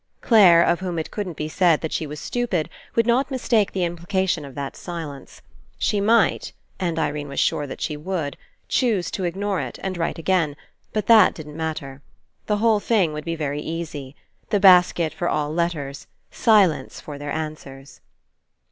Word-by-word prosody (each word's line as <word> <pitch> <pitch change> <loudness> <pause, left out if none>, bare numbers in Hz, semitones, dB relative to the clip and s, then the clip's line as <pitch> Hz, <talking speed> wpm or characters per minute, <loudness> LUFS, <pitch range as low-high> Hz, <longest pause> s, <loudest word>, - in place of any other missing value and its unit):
Clare, 185 -7 +6
of 175 - +2
whom 180 -2 -4
it 160 - -4
couldn't 190 -6 -5
be 155 - -3
said 170 0 +3
that 160 - -3
she 155 - -2
was 150 +1 -7
stupid, 235 -10 -2 0.3
would 230 - +3
not 245 +4 +2
mistake 235 -6 +1
the 190 - -2
imphcation 175 0 -1
of 135 -2 -10
that 140 -1 -5
silence. 160 -6 -8 0.3
She 205 - 0
might 220 +1 +2
— - - -38
and 170 -3 -1
Irene 150 -2 -2
was 140 - -4
sure 145 - +1
that - - -8
she 150 - -2
would 155 -2 -3 0.2
— - - -44
choose 220 -8 0
to 190 - -3
ignore 195 0 -1
it 130 -3 -6
and 190 -1 -2
write 165 - -1
again, 165 -3 +1 0.4
but 215 -2 -2
that 220 -4 +6
didn't 150 -2 -9
matter. 155 -4 -5 0.5
The 210 - +1
whole 220 0 +3
thing 200 -8 +1
would 150 0 -6
be 165 -1 -2
very 145 -2 -3
easy. 150 -5 -6 0.3
The 205 - +2
basket 180 -4 +5
for 175 +2 -2
all 150 0 -1
letters, 155 -5 -3 0.2
silence 195 - +3
for 145 -2 -9
their 145 0 -5
answers. 150 -3 -7
170 Hz, 185 wpm, -23 LUFS, 150-195 Hz, 0.5 s, Clare